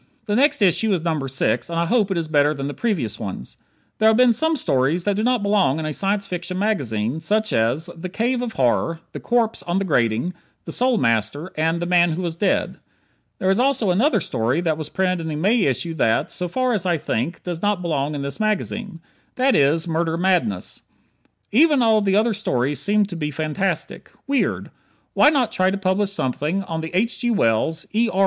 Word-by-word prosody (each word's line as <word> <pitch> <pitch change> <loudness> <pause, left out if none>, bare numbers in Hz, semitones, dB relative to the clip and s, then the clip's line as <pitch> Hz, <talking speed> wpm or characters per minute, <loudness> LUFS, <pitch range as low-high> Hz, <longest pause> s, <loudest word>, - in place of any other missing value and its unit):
The 205 -2 -1
next 270 -3 +3
issue 200 +4 +3
is 170 -4 -1
number 155 -5 -1
six, 135 +5 -1
and 165 - -3
I 170 - +1
hope 215 +1 +1
it 190 - -1
is 165 -1 -2
better 150 0 +2
than 140 -1 -4
the 145 - -4
previous 145 - -2
ones. 95 -10 -7 0.4
There 220 - +4
have 220 - +3
been 250 -1 +5
some 320 +8 +1
stories 150 - 0
that 205 +1 0
do 210 - -1
not 245 -1 +1
belong 200 -9 +2
in 160 - -3
a 155 - -3
Science 200 +4 -1
Fiction 180 +1 -5
magazine, 140 - -1
such 215 +5 0
as: 120 +9 +1
"The 175 +2 -6
Cave 240 +6 -1
of 240 -2 -4
Horror," 135 +6 0
"The - - -7
Corpse 235 -2 0
on 175 +1 -2
the 195 - 0
Grating," 120 +1 0 0.3
"The - - -6
Soul 250 -1 +1
Master," 115 - 0
and 160 +2 0
"The 175 - -2
Man 175 -1 +3
who 180 +3 -4
was 170 -2 -3
Dead." 190 +3 0 0.6
There 190 0 +1
is 195 - +1
also 250 -6 +2
another 240 - +2
story 115 +7 -1
that 165 -3 0
was 155 -1 -6
printed 185 0 0
in 160 - -5
the 155 - -3
May 200 +10 +2
issue 145 +5 -1
that, 115 -8 +1
so 180 - -3
far 255 +7 0
as 205 -5 0
I 175 -3 +1
think, 140 +3 -3
does 175 -2 -5
not 205 -3 0
belong 150 -3 -1
in 140 - -4
this 140 +8 -5
magazine: 215 -3 -2 0.3
that 260 +1 +2
is, 155 +4 +2
"Murder 165 0 -1
Madness." 170 - 0 0.7
Even 290 +3 +4
all 220 -2 +4
the 195 -1 +1
other 220 +2 +2
stories 140 - -1
seem 210 0 +2
to 195 -3 -8
be 150 -3 -3
fantastic. 155 +6 -3 0.2
Weird. 275 -1 -1 0.4
Why 295 - +6
not 275 -6 +1
try 185 0 +2
to 195 - -2
publish 195 +1 0
something 155 +3 -2
on 165 -3 -4
the 160 - -5
H. 230 +5 0
G. 240 - 0
Wells, 160 - +1
E. 230 +2 +2
R. 190 - -2
180 Hz, 215 wpm, -21 LUFS, 155-215 Hz, 0.7 s, Why